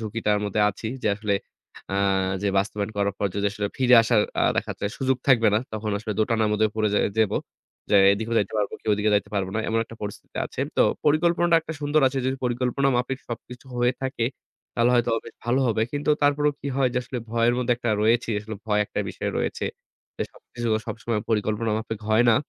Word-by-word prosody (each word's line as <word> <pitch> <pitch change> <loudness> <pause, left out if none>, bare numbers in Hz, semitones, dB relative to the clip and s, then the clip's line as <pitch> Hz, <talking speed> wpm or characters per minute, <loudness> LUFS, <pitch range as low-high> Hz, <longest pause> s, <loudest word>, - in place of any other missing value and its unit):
ঝুঁকিটার 110 -1 0
মধ্যে 105 +1 -1
আছি। 110 - -8 0.2
যে - - +2
আসলে 105 -2 0 0.6
আ - - +1 0.5
যে 100 - +1
বাস্তবায়ন 100 +1 -1
করার 100 -1 0
পর 100 - +1
যদি 100 0 0
আসলে 105 0 -2
ফিরে 125 -1 +5
আসার 115 -1 +3 0.2
আ - - +3
দেখাচ্ছে - - -2
সুযোগ 130 -1 +1
থাকবে 115 -4 +6
না - - +4
তখন 110 0 -3
আসলে 110 0 -4
দোটানার 110 0 +2
মধ্যে 110 +1 +3
পড়ে 110 -1 +2
যা - - +3 0.2
যাব। 110 -2 +3 0.6
যে 105 - +6 0.2
এদিকেও 110 +3 -2
যাইতে 100 - -1
পারব 105 -1 0
কি - - -24
ওদিকে 105 +1 +1
যাইতে 100 - 0
পারব 100 -2 0
না - - 0
এমন 115 - +1
একটা 115 - -12
পরিস্থিতিতে 105 -1 -7
আছে। - - -7 0.2
তো - - +6 0.2
পরিকল্পনাটা 170 +2 +4
একটা 160 0 -6
সুন্দর 145 +1 +2
আছে। 135 +1 -3
যদি 130 +1 0
পরিকল্পনা 125 +2 +1
মাফিক 125 +2 -1
সবকিছু 125 +2 -8
হয়ে 120 +1 +3
থাকে 130 -3 -1 0.5
তাহলে 120 +1 +3
হয়তোবা 115 -1 +2
বেশ - - -10
ভালো 120 +3 +2
হবে। 110 -1 +1
কিন্তু 145 +1 0
তারপরও 145 +1 +3
কি 140 - -4
হয় 135 -2 +3
যে 125 - +2
আসলে 125 0 -5
ভয়ের 115 +1 +2
মধ্যে 125 -1 +2
একটা 120 -1 -2
রয়েছি। 115 +2 +2
আসলে 110 +1 -7
ভয় 105 -1 +2
একটা - - -3
বিষয় - - -3
রয়েছে। - - -2 0.5
যে - - +1
সবকিছু 120 -1 -6 0.2
সবসময় 115 0 -2
পরিকল্পনা 110 +1 0
মাফিক 110 -1 -5
হয় 110 +2 +4
না। - - +5
115 Hz, 205 wpm, -25 LUFS, 105-125 Hz, 0.6 s, থাকবে